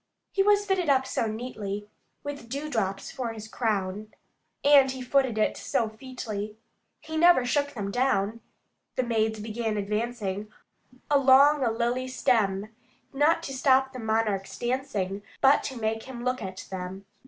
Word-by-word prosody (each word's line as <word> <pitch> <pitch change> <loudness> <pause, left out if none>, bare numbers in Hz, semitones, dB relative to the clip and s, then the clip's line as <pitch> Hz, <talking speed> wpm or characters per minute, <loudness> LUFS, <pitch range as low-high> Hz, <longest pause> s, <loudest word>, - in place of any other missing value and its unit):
He 390 - +1
was 410 0 +4
fitted 380 -5 0
up 265 -1 +4
so 230 - -1
neatly, 215 -3 -5 0.4
With 285 -5 -6
dewdrops 230 -9 -2
for 240 -3 -4
his 220 -1 -8
crown, 210 -2 -2 0.5
And 280 -2 +7
he 260 0 -4
footed 260 -3 +2
it 215 - +2
so 225 -2 0
featly 215 -3 -6 0.4
He 315 0 -5
never 340 -6 +6
shook 285 +3 0
them 200 -3 -3
down. 230 -3 +1 0.5
The 255 - +1
maids 220 -2 0
began 220 0 -2
advancing, 210 -1 -2 0.6
along 280 +1 +6
a 240 - +3
lily 240 +3 -1
stem, 215 -5 0 0.4
Not 310 +4 +3
to 270 - -5
stop 265 0 +3
the 255 - -6
monarch's 220 -3 -1
dancing, 215 -6 -2 0.2
but 275 +1 +5
to 265 - -4
make 220 0 -1
him 245 -2 -7
look 250 0 0
at 190 -2 -6
them. 190 +1 -6
235 Hz, 150 wpm, -27 LUFS, 210-265 Hz, 0.6 s, And